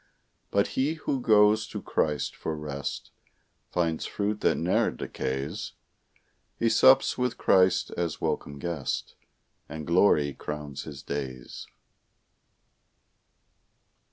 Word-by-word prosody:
But 100 Hz, 0 st, +2 dB
he 140 Hz, +5 st, 0 dB
who 140 Hz, -4 st, -2 dB
goes 105 Hz, -1 st, +4 dB
to -, -, -6 dB
Christ 75 Hz, -3 st, -1 dB
for 80 Hz, -, -4 dB
rest, 70 Hz, -2 st, -5 dB, 0.6 s
Finds 85 Hz, -2 st, -1 dB
fruit 105 Hz, +1 st, -2 dB
that -, -, +2 dB
ne'er -, -, +2 dB
decays. 65 Hz, +2 st, -4 dB, 0.8 s
He 115 Hz, -, +2 dB
sups 130 Hz, +2 st, +5 dB
with 125 Hz, -1 st, 0 dB
Christ 95 Hz, 0 st, +3 dB
as 85 Hz, -3 st, -3 dB
welcome 70 Hz, -, -2 dB
guest, 80 Hz, -3 st, -3 dB, 0.6 s
And 80 Hz, -1 st, -6 dB
glory 85 Hz, -5 st, +3 dB
crowns 75 Hz, -2 st, -6 dB
his 70 Hz, -2 st, -9 dB
days. 65 Hz, -3 st, -6 dB
85 Hz, 105 wpm, -27 LUFS, 70-105 Hz, 0.8 s, sups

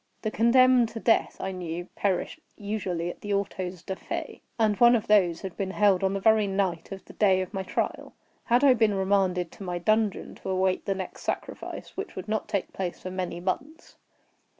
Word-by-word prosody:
The 215 Hz, -, -1 dB
condemned 245 Hz, +1 st, +5 dB
to 225 Hz, -, -7 dB
death, 225 Hz, -, +2 dB
I 190 Hz, -, -3 dB
knew, 175 Hz, -2 st, -5 dB
perished 200 Hz, -, -1 dB, 0.2 s
usually 190 Hz, -5 st, -3 dB
at -, -, -15 dB
the 205 Hz, -1 st, -1 dB
autos 185 Hz, -3 st, -3 dB
da 190 Hz, -, -4 dB
fe, -, -, -6 dB, 0.2 s
and 215 Hz, -2 st, +3 dB
one 240 Hz, 0 st, +7 dB
of 225 Hz, -1 st, -1 dB
these 180 Hz, -6 st, +3 dB
had 190 Hz, -3 st, -6 dB
been 195 Hz, -1 st, -2 dB
held 195 Hz, -1 st, +3 dB
on 190 Hz, +1 st, +1 dB
the -, -, -1 dB
very 220 Hz, 0 st, +4 dB
night 190 Hz, -3 st, -1 dB
of 195 Hz, -1 st, -8 dB
the -, -, -13 dB
day 190 Hz, -3 st, +3 dB
of 185 Hz, +3 st, -4 dB
my 195 Hz, -, -2 dB
trial. 190 Hz, -, -3 dB, 0.3 s
Had 240 Hz, +3 st, +3 dB
I 275 Hz, -2 st, +7 dB
been 220 Hz, -4 st, +2 dB
remanded 190 Hz, -3 st, +1 dB
to -, -, -10 dB
my 180 Hz, -2 st, -3 dB
dungeon, 215 Hz, +3 st, 0 dB
to -, -, -5 dB
await 185 Hz, 0 st, +1 dB
the 195 Hz, -, 0 dB
next 190 Hz, -1 st, -6 dB
sacrifice, -, -, -5 dB
which 390 Hz, -, -6 dB
would 185 Hz, +1 st, -6 dB
not 215 Hz, 0 st, -1 dB
take 200 Hz, -3 st, -2 dB
place 180 Hz, -2 st, -4 dB
for 185 Hz, -, -6 dB
many 180 Hz, -2 st, -3 dB
months? 280 Hz, -, -4 dB
195 Hz, 205 wpm, -27 LUFS, 185-220 Hz, 0.3 s, one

